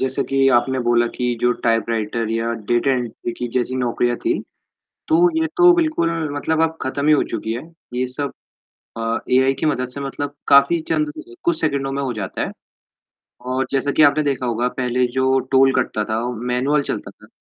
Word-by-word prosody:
जैसे 130 0 0
कि 135 0 +2
आपने 130 +2 +2
बोला 120 0 +3
कि 125 -1 -1
जो 120 - +3 0.2
टाइपराइटर 115 0 0
या 115 +1 -1 0.2
डाटा 120 +3 +3
एंट्री 120 -1 -4
की 125 - -2
जैसी 130 +1 -1
नौकरियाँ 120 -1 0
थी 345 - +3 0.8
तो 345 +2 +5
ये 320 - +2
तो 355 -1 +7
बिल्कुल 315 - +1 0.3
मतलब 160 +2 0
अब 160 0 0
ख़त्म 140 +2 -2
ही 155 - +6
हो 150 - +4
चुकी 110 - -3
है। 120 - -4 0.3
ये 125 +1 0
सब 140 +3 -4 0.6
अ, 115 0 -1
एआई 130 +1 +4
की 145 - -2
मदद 130 -4 0
से 125 +3 -8
मतलब 140 +1 -4
काफ़ी 140 +4 +6
चंद 305 -1 0 0.3
कुछ 340 -1 +1
सेकंडों 135 -1 -1
में 140 +1 -2
हो 130 -2 -2
जाता 105 -4 -4
है। - - -3 1.0
और 130 +1 0
जैसा 140 +1 0
कि 155 - +3
आपने 145 +1 +5
देखा 135 -3 -1
होगा, 120 +1 0
पहले 125 0 0
जो 130 0 +2
टोल 135 0 +5
कटता 120 -4 0
था, 110 +1 -2
मैनुअल 125 +5 0
चलता - - -4
था। - - -19
130 Hz, 190 wpm, -20 LUFS, 120-145 Hz, 1.0 s, तो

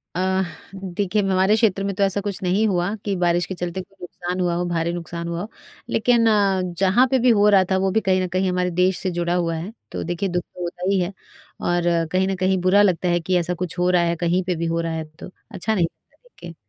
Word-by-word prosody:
अ, 190 +1 +1 0.3
देखिए 195 +2 -1
हमारे 190 +1 +3
क्षेत्र 205 -4 +2
में 200 0 -1
तो 200 - +1
ऐसा 195 +1 +1
कुछ 200 -1 -4
नहीं 195 +5 +2
हुआ 185 +1 0
कि 200 -2 0
बारिश 175 -1 +1
के 190 - -6
चलते 175 +1 -4
कोई 195 +1 -18
नुकसान 180 +1 -5
हुआ 175 -1 +1
हो, 175 +1 -1
भारी 170 -1 -1
नुकसान 170 0 -5
हुआ 170 0 -3
हो, 210 - -6 0.4
लेकिन 235 0 +3
अ, 200 -3 +3 0.2
जहाँ 195 +7 +4
पे 265 - +3
भी 250 +1 +3
हो 210 -3 +5
रहा 195 -2 +6
था 190 - +3
वो 190 0 +1
भी 220 +3 +2
कहीं 185 -1 +2
न 185 - -1
कहीं 185 +1 0
हमारे 180 0 0
देश 180 +1 +2
से 185 - -2
जुड़ा 175 0 -1
हुआ 170 -2 0
है, 170 +6 -5 0.2
तो - - -4
देखिए 175 +3 -2
दुख 175 -1 -1
तो 180 - -13
होता 175 +1 -6
ही 195 -1 +2
है 180 +3 -2 0.5
और 175 0 0 0.3
कहीं 185 +1 +2
न 195 - -1
कहीं 190 +1 +1
बुरा 185 +3 +4
लगता 185 -3 +2
है 175 0 +2
कि 180 +2 0
ऐसा 175 +1 -2
कुछ 180 0 -5
हो 180 0 +2
रहा 180 -1 +4
है, 170 0 +1
कहीं 175 +2 0
पे 180 0 -1
भी 170 +1 -3
हो 165 0 0
रहा 165 -1 -3
है 160 0 -3 0.2
तो - - -8 0.2
अच्छा 210 +3 -2
नहीं 175 -4 +3
लगता 165 - -13
देखिए। 175 - -13
185 Hz, 260 wpm, -22 LUFS, 175-195 Hz, 0.5 s, रहा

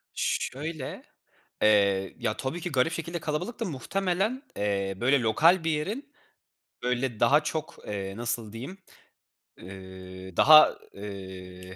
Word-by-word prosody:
Şöyle, 145 +1 -3 0.6
eee, 100 -2 +3
ya, 110 - -2
tabii 160 +6 -4
ki 180 - -4
garip 135 +4 +2
şekilde 170 +1 -4
kalabalıktı, 160 +10 -3
muhtemelen, 195 - -1
eee, 100 -1 0
böyle 130 +2 +3
lokal 160 +10 +4
bir 165 - +1
yerin 220 - -3 0.7
böyle 125 -2 -1
daha 145 +6 +5
çok, 155 0 -3
eee, 100 -1 -4
nasıl 115 -2 -3
diyeyim, 135 +12 -7 0.8
ııı, 95 -1 -10
daha, 155 +1 +8 0.2
ııı, 95 -2 -9
125 Hz, 115 wpm, -28 LUFS, 100-165 Hz, 0.8 s, daha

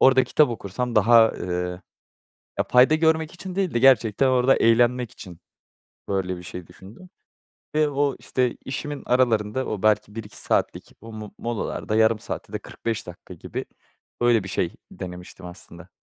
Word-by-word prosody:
orada 130 0 +6
kitap 150 -3 +3
okursam 120 +2 -4
daha, 115 +2 +6
ııı, 90 0 -4 0.8
ya, - - +2
fayda 125 +5 +6
görmek 160 +1 +2
için 185 +1 -8
değil 190 -8 -1
de - - +3
gerçekten 125 -1 +4
orada 130 +1 +4
eğlenmek 120 +1 +3
için 90 -3 -12 0.7
böyle 95 -2 -1
bir 90 - -10
şey 90 -1 -8
düşündüm 115 - -14 0.7
ve 155 -1 +3
o, 140 0 0
işte, 125 -2 -1
işimin 145 +2 -5
aralarında 120 -1 +1
o 105 -3 -4
belki 105 0 +2
1-2 105 -2 -8
saatlik - - -1
o 115 0 -10
mo 110 -1 -8
molalarda 115 -2 -3
yarım 110 0 +4
saat - - -6
ya - - -16
da - - -2
45 115 -4 -5
dakika 90 +1 -11
gibi, 85 - -6 0.6
öyle, 120 -4 +4
bir 95 - -7
şey 90 -3 -1 0.2
denemiştim 90 0 -9
aslında. 90 0 -10
115 Hz, 160 wpm, -24 LUFS, 95-130 Hz, 0.8 s, orada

